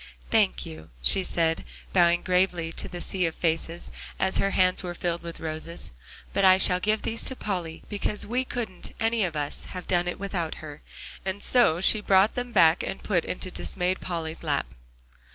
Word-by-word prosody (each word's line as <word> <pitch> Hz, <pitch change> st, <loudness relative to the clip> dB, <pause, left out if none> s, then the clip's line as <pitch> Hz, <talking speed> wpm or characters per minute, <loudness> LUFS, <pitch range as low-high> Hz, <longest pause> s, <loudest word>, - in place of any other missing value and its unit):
"Thank 60 Hz, +1 st, +3 dB
you," 80 Hz, 0 st, -10 dB
she 190 Hz, -, +5 dB
said, 165 Hz, -2 st, 0 dB, 0.3 s
bowing 175 Hz, -1 st, +4 dB
gravely 180 Hz, -2 st, +1 dB
to -, -, -4 dB
the 175 Hz, -1 st, -7 dB
sea 185 Hz, -1 st, 0 dB
of 165 Hz, -, -5 dB
faces, 165 Hz, 0 st, -1 dB, 0.3 s
as 190 Hz, 0 st, +2 dB
her 195 Hz, -, +2 dB
hands 185 Hz, -1 st, +3 dB
were 175 Hz, -2 st, -5 dB
filled 170 Hz, 0 st, -2 dB
with 170 Hz, -1 st, -8 dB
roses, 160 Hz, +1 st, -4 dB, 0.4 s
"but 200 Hz, -, +1 dB
I 185 Hz, -1 st, +8 dB
shall 180 Hz, -1 st, +4 dB
give 215 Hz, +3 st, +1 dB
these 230 Hz, 0 st, -1 dB
to 260 Hz, -, -1 dB
Polly, 180 Hz, -8 st, -4 dB
because 210 Hz, 0 st, -2 dB
we 250 Hz, +4 st, 0 dB
couldn't 230 Hz, -7 st, -5 dB
any 225 Hz, -1 st, +2 dB
of 170 Hz, -4 st, -2 dB
us 145 Hz, -1 st, -3 dB
have 180 Hz, -1 st, -7 dB
done 175 Hz, -1 st, +2 dB
it 180 Hz, -, -2 dB
without 190 Hz, -5 st, -3 dB
her." 150 Hz, -1 st, -9 dB, 0.4 s
And 190 Hz, +1 st, -3 dB
so 180 Hz, -10 st, +4 dB
she 210 Hz, +2 st, +4 dB
brought 195 Hz, +1 st, +4 dB
them 245 Hz, 0 st, -4 dB
back 165 Hz, -5 st, +5 dB
to -, -, -3 dB
put 185 Hz, -3 st, -1 dB
into 185 Hz, 0 st, -3 dB
dismayed 180 Hz, +1 st, -1 dB
Polly's 165 Hz, -2 st, -4 dB
lap. -, -, 0 dB
180 Hz, 190 wpm, -26 LUFS, 165-195 Hz, 0.4 s, I